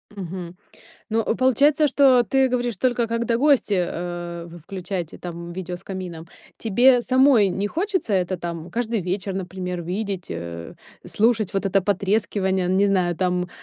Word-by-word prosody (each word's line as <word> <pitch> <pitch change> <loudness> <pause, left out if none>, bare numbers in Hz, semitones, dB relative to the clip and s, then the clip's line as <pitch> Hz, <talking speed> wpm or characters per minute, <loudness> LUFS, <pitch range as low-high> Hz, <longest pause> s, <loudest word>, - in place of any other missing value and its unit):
Мгм. 180 -2 -6 0.6
Ну, 225 0 +1
получается, 285 +4 +3
что 265 -3 +5
ты 265 +5 +2
говоришь 245 -3 -1
только 240 +1 0
когда 230 0 0
гости, 275 -5 +3
э, 175 -1 -4 0.2
включаете 185 -3 -5
там 170 -1 -7
видео 180 0 -5
с 175 - -9
камином. 180 -4 -7 0.3
Тебе 245 +3 +4
самой 255 -4 +4
не 195 +2 -2
хочется 370 - -2
это 185 0 0
там 170 -1 -6
каждый 230 -2 -1
вечер, 190 +2 -3
например, 180 -1 -4
видеть, 190 +1 -4
э, 85 0 -6 0.3
слушать 220 -2 +1
вот 195 0 -1
это 195 0 +2
потрескивание, 190 -1 0
не 190 +2 +3
знаю, 180 -4 +1
там, 180 0 0
195 Hz, 145 wpm, -23 LUFS, 180-235 Hz, 0.6 s, что